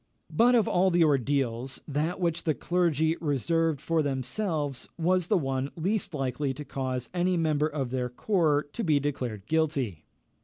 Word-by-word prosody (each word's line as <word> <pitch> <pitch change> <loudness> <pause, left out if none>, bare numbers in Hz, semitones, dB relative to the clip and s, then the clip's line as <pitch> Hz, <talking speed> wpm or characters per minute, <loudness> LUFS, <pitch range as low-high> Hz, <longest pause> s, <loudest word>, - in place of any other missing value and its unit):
But 245 +2 +5
of 225 -4 +3
all 185 +2 +3
the 175 -1 +4
ordeals, 135 -3 0
that 155 +5 -1
which 170 -2 0
the 155 -3 0
clergy 165 0 +1
reserved 160 +1 +1
for 165 -1 +1
themselves 145 - -2
was 180 +1 +1
the 205 - +3
one 135 -3 -1
least 190 +1 -1
likely 135 0 -1
to 150 - -7
cause 130 -3 -3
any 180 0 +1
member 155 -2 +2
of 140 -5 -3
their 125 -1 -1
corps 150 - +1
to 235 - -3
be 155 -4 +3
declared 125 -8 -3
guilty. 140 - -1
150 Hz, 160 wpm, -28 LUFS, 135-170 Hz, -, But